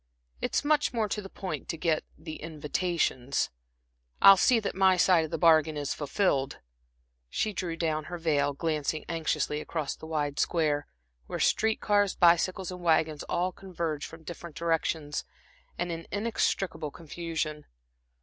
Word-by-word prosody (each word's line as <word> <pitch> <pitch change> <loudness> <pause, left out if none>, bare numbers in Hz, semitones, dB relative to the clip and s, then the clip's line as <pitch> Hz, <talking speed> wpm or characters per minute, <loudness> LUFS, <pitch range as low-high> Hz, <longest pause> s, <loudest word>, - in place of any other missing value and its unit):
"It's - - 0
much 295 -3 +2
more 220 -2 +1
to 210 - -2
the 195 - -9
point 190 -1 -6
to 165 - -2
get 160 0 +1
the 155 0 -7
invitations. 155 -4 -1 0.7
I'll 195 - +10
see 235 +5 +4
that 210 - -3
my 190 -1 +4
side 175 -2 +4
of - - -8
the - - -2
bargain 160 -2 +4
is 145 -1 -2
fulfilled." 145 -2 0 0.7
She 215 - -1
drew 175 -3 -3
down 155 -2 -1
her 175 - -5
veil, 145 -4 +1
glancing 155 0 -2
anxiously 155 -2 -1
across 155 -2 -3
the 160 - -11
wide 150 -2 -2
Square, 150 -3 +1 0.4
where - - -4
street 220 0 +2
cars, 205 -2 +2
bicycles 180 +2 +3
and 180 0 -8
wagons 160 -3 +2
all 180 +2 0
converge 170 -6 -4
from 165 0 -13
different 170 -1 -8
directions 160 -3 -1 0.5
and 175 0 -2
in 165 0 -6
inextricable 195 -6 -1
confusion. 160 -1 -5
165 Hz, 150 wpm, -29 LUFS, 155-185 Hz, 0.7 s, I'll